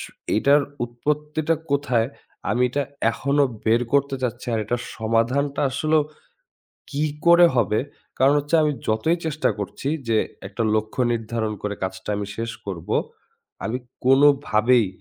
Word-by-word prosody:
স - - -5 0.3
এটার 140 +6 +4 0.2
উৎপত্তিটা 150 +6 -1 0.2
কোথায়? 130 -5 +1 0.4
আমি 125 - +1
এটা 145 +3 0 0.3
এখনো 140 +4 +2 0.2
বের 115 +2 +4
করতে 140 -1 +2
চাচ্ছি। 120 0 -3
আর - - +1
এটার 120 +3 -2 0.2
সমাধানটা 120 +6 +1
আসলেও 155 +3 +2 0.9
কি 145 +1 -1 0.2
করে 170 0 +8
হবে? 110 -2 +2 0.4
কারন 135 +3 +5
হচ্ছে 145 +3 -2
আমি 150 -1 +2 0.2
যতই 110 +11 +2
চেষ্টা 155 -1 0
করছি 105 +6 -4 0.2
যে 115 - +3 0.3
একটা 100 +4 -3
লক্ষ্য 110 +3 -1
নির্ধারন 115 -1 -2
করে, 105 0 -2
কাজটা 95 - -5
আমি 100 0 -3
শেষ 115 0 -3 0.2
করব, 90 -4 -6 0.8
আমি 120 +3 -1 0.3
কোনো 135 +3 +6 0.2
ভাবেই 110 +1 +4
125 Hz, 140 wpm, -23 LUFS, 110-145 Hz, 0.9 s, করে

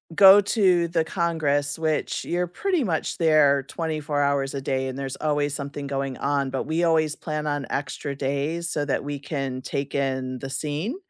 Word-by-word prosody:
go 195 0 +9
to 185 -4 +3
the 165 -1 +1
Congress, 160 -4 0
which 155 -2 -1
you're 175 +1 -1
pretty 355 - 0
much 165 -4 -1
there 150 -4 +4
24 155 -1 -2
hours 140 -1 +1
a 140 - -3
day 130 0 -1
and 130 0 -5
there's 135 -1 -4
always 145 -2 0
something 140 0 -5
going 135 -1 -3
on, 140 -1 0
but 130 0 -2
we 160 +4 -1
always 160 -2 +2
plan 155 -1 -4
on 145 -2 -1
extra 140 0 -3
days, 145 +5 -2
so 145 -1 -1
that 140 - -1
we 145 -1 -4
can 135 -3 -4
take 140 +1 -4
in 130 -2 -1
the 135 - -6
scene, 150 - -3
145 Hz, 185 wpm, -24 LUFS, 140-160 Hz, -, go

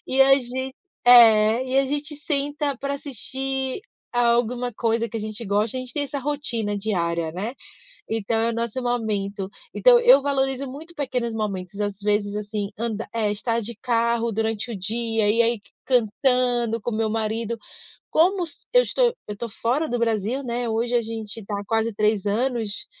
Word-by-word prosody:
E 265 +1 +1
a 270 0 +7
gen 260 +1 -4 0.3
É. 230 0 +7
E 260 +1 +1
a 275 - +4
gente 295 +2 -3
senta 290 -1 -1
pra 280 0 -2
assistir 265 - -3 0.3
alguma 240 0 +1
coisa 230 +1 0
que 230 - -6
a - - -3
gente 215 +1 -5
gosta. 210 +4 0
A - - -1
gente 255 -1 -8
tem 290 -2 -1
essa 280 +1 -4
rotina 240 -8 -2
diária, 170 -6 -1
né, 210 +8 -4 0.5
então 225 0 -1
é 230 - +2
o 230 - -4
nosso 235 +2 -2
momento. 205 -5 -2 0.3
Então - - +6
eu 485 -9 +7
valorizo 270 -1 0
muito 320 +6 -10
pequenos 250 -5 -2
momentos, 200 -2 -4
às 205 -1 -2
vezes 205 0 0
assim 210 -1 -3
anda 225 -1 -3
é 215 -2 +1
estar 230 +2 -1
de 230 0 -6
carro 235 -1 +1
durante 225 +2 -1
o - - -4
dia 225 +2 0
e 230 +2 +4
aí 230 -2 +1 0.3
cantando 245 -1 +2
com 240 - -2
o 215 - -3
meu 220 -1 +1
marido 225 +1 -2 0.5
como 360 +3 +3 0.3
eu - - +7
estou - - +2 0.2
eu 210 - -3
estou 230 +3 -5
fora 250 +8 -1
do 245 - -1
Brasil, 230 +3 0
né. 240 0 -2
Hoje 235 +2 -1
a 235 - +3
gente 225 -1 -5
está 205 0 -4
há - - -8
quase 225 +2 0
3 210 -1 +1
anos, 225 -1 -1
235 Hz, 180 wpm, -24 LUFS, 215-260 Hz, 0.5 s, a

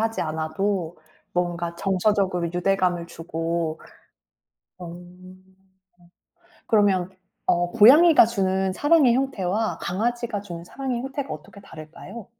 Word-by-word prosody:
하지 225 0 -1
않아도 160 +3 -2 0.4
뭔가 175 -1 -2
정서적으로 190 -2 0
유대감을 180 -1 0
주고 165 -1 -3 1.0
어. 180 - -8
어 175 +1 -9 1.6
그러면 195 -4 +2 0.4
어 175 0 +1
고양이가 285 +8 +7
주는 190 -4 0
사랑의 290 - +4
형태와 220 -5 -1
강아지가 230 +3 -2
주는 170 -4 -9
사랑의 255 +4 -4
형태가 270 +1 -5
어떻게 155 +7 -10
다를까요? 165 +6 -11
190 Hz, 265 characters per minute, -24 LUFS, 170-225 Hz, 1.6 s, 고양이가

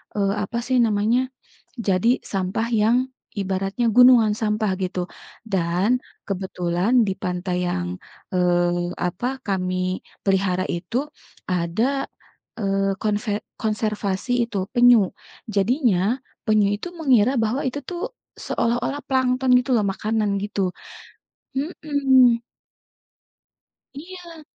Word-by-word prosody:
eee, 200 -1 +1
apa 235 +3 -3
sih 260 0 +2
namanya, 215 +3 +2 0.6
jadi 205 0 +1
sampah 195 +3 -2
yang 225 +3 +4 0.4
ibaratnya 195 +4 -1
gunungan 245 -2 +6
sampah 215 -2 0
gitu. 180 -1 -2 0.4
Dan, 190 +3 +1 0.3
kebetulan 190 +3 +1
di 195 - 0
pantai 180 -1 -2
yang, 90 - -3 0.4
eee, 175 -1 +1
apa, 245 +10 -2
kami 185 -1 -1 0.2
pelihara 190 -1 +1
itu 175 +7 -3 0.5
ada, 185 +11 0 0.5
eee, 195 -1 +1
konve 210 0 -1 0.2
konservasi 215 0 -1
itu, 200 -5 -3
penyu. 240 -5 +6 0.5
Jadinya 225 - +2 0.3
penyu 215 -2 +3
itu 215 - -6
mengira 255 -5 +4
bahwa 235 +6 0
itu 260 +3 -3
tuh 350 -1 -5 0.4
seolah-olah 245 +5 -1
plankton 260 0 +1
gitu 255 +1 -3
loh, 215 -3 +2
makanan 215 +2 -1
gitu, 200 -2 -1 0.9
mhm. 270 -5 +3 1.5
Iya. 340 +1 -10
210 Hz, 105 wpm, -23 LUFS, 185-245 Hz, 1.5 s, gunungan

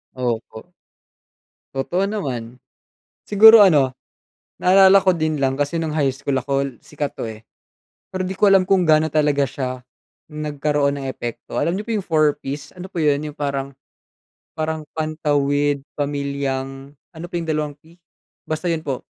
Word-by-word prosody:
Opo. 120 +3 -4 1.0
Totoo 175 +9 0
naman. 125 - -4 0.7
Siguro 220 +1 +8
ano, 140 -9 +4 0.6
naalala 190 +1 +6
ko 185 - +5
din 155 -3 -1
lang, 135 +1 0
kasi 145 +3 -1
nung 160 -2 -1
high 140 -4 0
school 135 -1 -1
ako 135 -1 -2
sikat 145 -1 -5
to - - -6
eh. 110 0 -9 0.7
Pero 185 -1 -3
di 190 - -4
ko 200 +1 +4
alam 190 -1 +4
kung 190 -2 +3
gaano 155 -1 +4
talaga 145 -2 +1
siya 130 -1 -4 0.6
nagkaroon 150 -2 -1
ng 135 - -5
epekto. 120 -3 -6
Alam 175 +4 0
niyo 210 - -7
po 230 - -3
yung 205 - -2
4Ps, 150 -2 -1
ano 185 +1 -9
po 170 - -4
yun 150 -1 +2
yung 145 - -21
parang, 140 -1 -3 0.8
parang 155 -1 -3
pantawid 145 -2 0 0.2
pamilyang 140 -1 -3 0.2
ano 165 0 -9
pa 175 - -14
yung 165 - -6
dalawang 150 -1 -1
P? 165 +2 -21 0.5
Basta 155 +3 -2
yun 160 -1 -2
po. 135 -3 -3
150 Hz, 155 wpm, -21 LUFS, 140-165 Hz, 1.0 s, Siguro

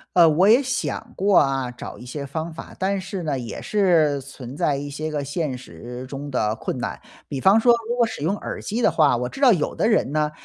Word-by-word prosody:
呃， 170 -2 +8
我 170 +5 +4
也 245 +5 +6
想 235 -2 -3
过 195 +1 +3
啊， 135 -2 +2
找 125 0 -9
一 - - -10
些 140 +3 -5
方 160 +4 -4
法， 160 - -10
但 195 +1 0
是 190 0 -5
呢， 150 -5 -1
也 120 -3 -6
是 170 -8 +2
存 135 -1 -10
在 145 - +1
一 145 +1 -5
些 155 +2 -4
个 145 -2 -2
现 145 -1 -2
实 125 +3 -9
中 140 +2 -6
的 110 -4 0
困 - - -4
难。 - - -4 0.3
比 140 - -4
方 195 +10 +5
说 240 +2 +5 0.2
如 240 - -1
果 245 - +3
使 - - -7
用 190 +6 +1
耳 - - -6
机 225 +4 -3
的 - - +5
话， 150 -6 +3
我 125 +1 -2
知 - - -10
道 265 -4 +6
有 165 -6 -1
的 - - +1
人 215 - +2
呢， 150 0 0
150 Hz, 260 characters per minute, -23 LUFS, 135-195 Hz, 0.3 s, 呃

